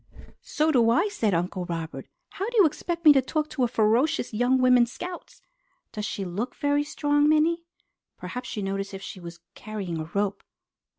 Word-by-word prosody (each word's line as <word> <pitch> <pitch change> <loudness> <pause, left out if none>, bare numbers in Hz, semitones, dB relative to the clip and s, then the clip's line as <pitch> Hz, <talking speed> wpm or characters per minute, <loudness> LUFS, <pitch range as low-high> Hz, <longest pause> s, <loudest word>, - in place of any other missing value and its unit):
"So 310 +1 0
do 235 -5 +4
I!" 345 - +3
said 220 - 0
Uncle 180 +2 -2
Robert. 165 -2 -5 0.2
"How 395 +4 -4
do 480 - -3
you 405 - +7
expect 335 +2 -3
me 300 - +10
to 270 - +4
talk 305 +4 -2
to 255 -4 +1
ferocious 235 +3 +1
young 245 +4 +2
women 250 -1 +5
Scouts? 355 +8 -9 0.5
Does 210 -1 -4
she 195 - -4
look 200 +8 -4
very 290 -1 +1
strong, 290 0 +1
Minnie? 330 +2 +2 0.5
Perhaps 250 -3 -6
you 205 - -2
noticed 195 +1 -3
if 195 - -8
she 190 - -8
was 170 -1 -10
carrying 200 -6 -5
a 155 - -4
rope?" 200 0 0
245 Hz, 180 wpm, -26 LUFS, 195-305 Hz, 0.5 s, me